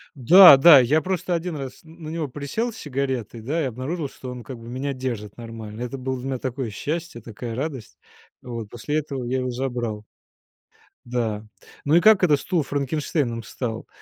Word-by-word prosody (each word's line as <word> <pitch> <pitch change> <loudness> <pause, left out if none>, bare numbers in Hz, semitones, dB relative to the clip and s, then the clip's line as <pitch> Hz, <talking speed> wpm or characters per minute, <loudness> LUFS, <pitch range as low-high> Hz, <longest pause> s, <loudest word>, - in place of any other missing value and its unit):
Да, 160 +4 +9
да, 145 +1 +9
я 140 +6 +3
просто 185 -1 -2
один 170 0 -2
раз 135 -3 -7
на 160 -1 -11
него 160 -1 -3
присел 145 - -3
с - - -12
сигаретой, 130 -5 -3
да, 150 +9 -1
и - - 0
обнаружил, 135 +5 -4
что 130 -1 -9
он 125 -1 -8
как 125 +2 -8
бы 115 0 -12
меня 130 +3 -3
держит 120 -6 -5
нормально. 115 -2 -8
Это 125 +2 -4
было 130 0 -3
для 130 - -6
меня 130 -2 -2
такое 130 -1 -3
счастье, 150 +4 -4
такая 115 +1 -7
радость. 135 -3 -5 0.4
Вот 115 -4 -6
после 135 +6 -3
этого 140 -4 -5
я 130 +2 -1
его 130 0 -2
забрал. 120 -4 -3 1.0
Да. 115 -3 -2 0.4
Ну 150 - +3
и 175 - +6
как 215 -3 +6
это 150 -5 +5
стул 170 +2 -1
Франкенштейном 140 -3 -2
стал? 115 -1 -5
130 Hz, 185 wpm, -23 LUFS, 120-155 Hz, 1.0 s, Да